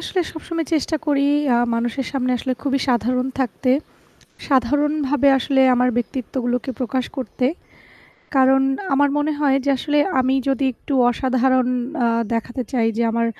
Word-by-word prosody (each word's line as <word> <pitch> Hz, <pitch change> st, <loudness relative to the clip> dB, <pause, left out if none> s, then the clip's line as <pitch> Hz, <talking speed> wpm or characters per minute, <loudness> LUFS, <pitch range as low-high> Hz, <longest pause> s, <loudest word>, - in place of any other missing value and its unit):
আসলে 370 Hz, -, -2 dB
সবসময় 330 Hz, -1 st, -4 dB
চেষ্টা 315 Hz, +1 st, 0 dB
করি 280 Hz, -1 st, +2 dB, 0.3 s
আ -, -, +4 dB, 0.2 s
মানুষের 240 Hz, +3 st, -2 dB
সামনে 255 Hz, -2 st, -1 dB
আসলে 260 Hz, -, -2 dB
খুবই 275 Hz, -1 st, 0 dB
সাধারণ 250 Hz, +1 st, +1 dB
থাকতে। 255 Hz, +1 st, -1 dB, 0.8 s
সাধারণভাবে 290 Hz, +1 st, +2 dB
আসলে 270 Hz, +1 st, +1 dB
আমার 250 Hz, 0 st, +2 dB
ব্যক্তিত্বগুলোকে 245 Hz, +1 st, -2 dB
প্রকাশ 255 Hz, 0 st, -1 dB
করতে। 255 Hz, -1 st, -2 dB, 0.9 s
কারণ 265 Hz, 0 st, +5 dB, 0.3 s
আমার 285 Hz, +1 st, +3 dB
মনে 300 Hz, +1 st, 0 dB
হয় 275 Hz, -2 st, +3 dB
যে 285 Hz, -, +2 dB
আসলে 295 Hz, +3 st, 0 dB, 0.2 s
আমি 260 Hz, +1 st, +1 dB
যদি 270 Hz, 0 st, 0 dB
একটু 285 Hz, -, -8 dB, 0.2 s
অসাধারণ 255 Hz, 0 st, +1 dB, 0.4 s
আ -, -, +3 dB, 0.3 s
দেখাতে 240 Hz, +2 st, -2 dB
চাই 235 Hz, -3 st, +1 dB
যে 235 Hz, -, +1 dB
আমার 230 Hz, +1 st, 0 dB
260 Hz, 145 wpm, -20 LUFS, 250-280 Hz, 0.9 s, কারণ